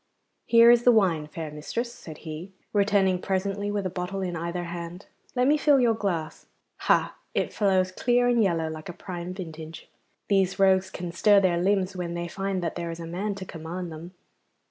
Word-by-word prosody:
'Here 235 0 +8
is 240 -1 +5
the 245 - +7
wine, 180 -9 +2
fair 155 0 -6
mistress,' 230 +11 -4
said 155 -2 -10
he, 160 +4 -7 0.2
returning 200 -3 +3
presently 200 +1 -1
with 205 -1 -2
a - - 0
bottle 185 +2 -3
in 180 -2 -3
either 170 +2 -3
hand. 170 +2 -7 0.3
'Let 250 0 +3
me 295 +3 +4
fill 290 -2 +4
your 240 -2 +4
glass. 175 -8 -3 0.3
Ha! - - +2 0.2
it - - 0
flows 190 -3 +2
clear 245 +5 +2
and 240 -1 +3
yellow 170 -5 +1
like 155 +1 -7
a - - -5
prime 175 0 -6
vintage. 160 -3 -8 0.4
These 195 -2 +2
rogues 190 -1 +4
can 175 -2 -6
stir 205 +3 +5
their 175 -3 +2
limbs 190 0 +1
when 175 -1 -4
they 170 0 -3
find 195 +1 -3
that 170 - -2
there 170 -1 -4
is 165 0 -6
a 165 - -6
man 195 +5 -3
to 190 -1 -7
command 170 +1 -6
them. 165 +4 -9
185 Hz, 195 wpm, -26 LUFS, 170-200 Hz, 0.4 s, Here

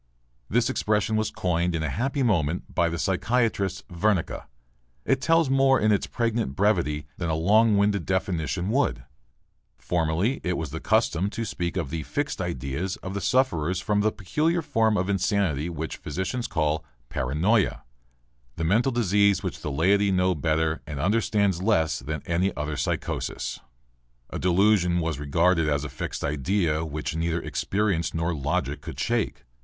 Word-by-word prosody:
This 120 +3 +2
expression 105 0 0
was 110 0 +1
coined 85 -1 0
in 80 - -1
a 75 - -1
happy 135 +4 -1
moment 85 - 0
by 85 -1 +2
the 85 - -3
psychiatrist 95 +1 0
Wernicke. 95 0 -1 0.6
It 135 - +2
tells 165 +1 +3
more 135 0 +4
in 110 0 +3
its 100 - +1
pregnant 115 - -1
brevity 85 -8 +1
than 85 - -2
a 80 - +1
long 105 +6 +4
winded 100 -3 +1
definition 90 -1 -1
would. 130 - +1 0.7
Formerly 85 +9 0
it 90 -1 -1
was 80 -4 -4
the 80 - -4
custom 100 -3 +1
to 115 +2 -4
speak 90 -3 -3
of 80 -7 -2
the 80 -1 -2
"fixed 70 - -3
ideas" 70 +9 -3
of 95 - -5
the 100 - -3
sufferers 95 - +1
from 105 +1 +1
the 110 +1 +2
peculiar 155 - 0
form 110 -5 +2
of 90 - 0
insanity 95 -6 0
which 80 -1 -5
physicians 115 +7 -3
call 80 -4 0 0.3
"paranoia," 75 - +1 0.7
the 80 - -3
mental 110 +10 +2
disease 100 -4 +2
which - - -4
the - - -3
laiety 95 +8 +3
knows 90 -2 +2
better 80 +1 0
and 75 -2 -5
understands 100 0 +1
less 80 - +2
than 75 +3 -5
any 90 +3 +1
other 75 +1 -2
psychosis. - - -3 0.7
A - - -4
delusion 90 -1 +3
was 80 -4 -2
regarded 80 +3 +2
as 70 -1 0
a 75 - -4
fixed 65 - -5
idea 80 +2 0
which 75 0 -4
neither 85 +1 0
experience 95 -4 -1
nor 85 +1 0
logic 75 -1 -2
could - - -8
shake. 60 - -1
90 Hz, 160 wpm, -26 LUFS, 80-105 Hz, 0.7 s, more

